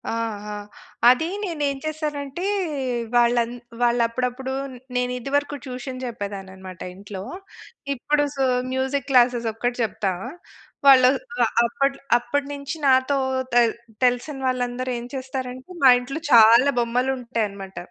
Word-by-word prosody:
ఆహా! 210 Hz, -2 st, -4 dB, 0.6 s
అది 255 Hz, +6 st, +4 dB, 0.2 s
నేను 335 Hz, -6 st, -4 dB
ఏం 275 Hz, -, -3 dB
చేశానంటే 300 Hz, 0 st, -4 dB, 0.7 s
వాళ్ళు 240 Hz, 0 st, +4 dB
అం 230 Hz, -, -7 dB, 0.3 s
వాళ్ళు 240 Hz, 0 st, +3 dB
అప్పుడప్పుడు 250 Hz, +2 st, -3 dB, 0.4 s
నేను 250 Hz, 0 st, 0 dB
ఇదివరకు 285 Hz, +3 st, -1 dB
ట్యూషన్ 255 Hz, 0 st, -6 dB
చెప్పేదాన్ని 200 Hz, -5 st, -6 dB
అన్నమాట 190 Hz, -2 st, -11 dB
ఇంట్లో. 195 Hz, 0 st, -8 dB, 0.7 s
ఇప్పుడు 290 Hz, +3 st, +1 dB
సో, 270 Hz, -, 0 dB, 0.3 s
మ్యూజిక్ 265 Hz, +1 st, -1 dB
క్లాసెస్ 245 Hz, -2 st, +4 dB
ఒక్కటి 245 Hz, +2 st, -2 dB
చెప్తా. 215 Hz, -3 st, -1 dB, 0.8 s
వాళ్ళు 255 Hz, -2 st, +8 dB, 0.4 s
ఆహ్, -, -, -2 dB
అప్పటి 275 Hz, +3 st, 0 dB, 0.2 s
అప్పటి 275 Hz, +4 st, -2 dB
నుంచి 280 Hz, +2 st, -5 dB
నాతో 260 Hz, +1 st, +4 dB, 0.4 s
తె 240 Hz, 0 st, +6 dB, 0.4 s
తెలిసిన 250 Hz, +3 st, +1 dB
వాళ్ళందరూ 255 Hz, 0 st, -1 dB
ఏం 235 Hz, -, -7 dB
చేస్తారంటే, 260 Hz, +1 st, -6 dB
మా 265 Hz, -, +9 dB
ఇంట్లో 275 Hz, +6 st, -6 dB
చాలా 235 Hz, +4 st, +7 dB
బొమ్మలు 245 Hz, +2 st, +1 dB
ఉంటాయన్నమాట. 205 Hz, -5 st, -4 dB
250 Hz, 125 wpm, -23 LUFS, 235-275 Hz, 0.8 s, మా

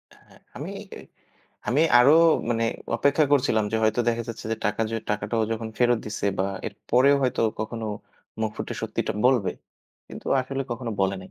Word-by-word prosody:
হ্যাঁ, -, -, -22 dB, 0.2 s
আমি 150 Hz, +6 st, -6 dB, 0.3 s
এ -, -, -8 dB, 0.7 s
আমি 135 Hz, +5 st, +3 dB, 0.2 s
আরো 130 Hz, +4 st, +7 dB, 0.4 s
মানে 115 Hz, -1 st, +1 dB, 0.3 s
অপেক্ষা 140 Hz, +5 st, +3 dB
করছিলাম 120 Hz, -6 st, +3 dB
যে -, -, +2 dB
হয়তো 110 Hz, +2 st, +2 dB
দেখা 115 Hz, 0 st, 0 dB
যাচ্ছে 115 Hz, -, -7 dB
যে -, -, -1 dB
টাকা 105 Hz, +2 st, 0 dB
যে 115 Hz, -, -1 dB
টাকাটাও 105 Hz, +2 st, -1 dB
যখন 115 Hz, 0 st, -4 dB
ফেরত 120 Hz, -1 st, +3 dB
দিচ্ছে 105 Hz, -1 st, -3 dB
বা 95 Hz, -, +2 dB, 0.2 s
এরপরেও 125 Hz, +6 st, +2 dB
হয়তো 130 Hz, -, 0 dB, 0.2 s
কখনো 110 Hz, +1 st, -4 dB, 0.5 s
মুখ 110 Hz, -1 st, 0 dB
ফুটে -, -, -4 dB
সত্যিটা -, -, -2 dB
বলবে। 125 Hz, -7 st, +3 dB, 0.6 s
কিন্তু -, -, -10 dB
আসলে 135 Hz, +1 st, -3 dB
কখনো 120 Hz, 0 st, -3 dB
বলে 95 Hz, 0 st, +2 dB
নাই। 95 Hz, -, -12 dB
115 Hz, 170 wpm, -25 LUFS, 110-125 Hz, 0.7 s, আরো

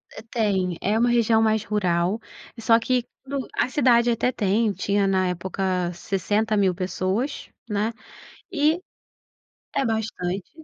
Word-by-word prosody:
Eh, -, -, -7 dB
tem. 190 Hz, -6 st, 0 dB
É 210 Hz, +3 st, +1 dB
uma 240 Hz, +2 st, +3 dB
região 230 Hz, -2 st, +3 dB
mais 220 Hz, -1 st, +2 dB
rural, 185 Hz, -1 st, 0 dB, 0.4 s
só 225 Hz, 0 st, +4 dB
que 250 Hz, +1 st, 0 dB, 0.2 s
tudo 275 Hz, -1 st, -4 dB
a -, -, +1 dB
cidade 245 Hz, -3 st, +4 dB
até 235 Hz, +2 st, +1 dB
tem 210 Hz, 0 st, +1 dB
tinha 200 Hz, 0 st, +1 dB
na 190 Hz, -1 st, +2 dB
época 180 Hz, 0 st, -1 dB
60.000 200 Hz, +2 st, +1 dB
pessoas, 190 Hz, +9 st, -2 dB, 0.2 s
né, 210 Hz, +2 st, 0 dB, 0.6 s
e 315 Hz, +1 st, +2 dB, 0.9 s
É 275 Hz, -, 0 dB
bastante, 205 Hz, -5 st, -2 dB
215 Hz, 130 wpm, -24 LUFS, 190-235 Hz, 0.9 s, só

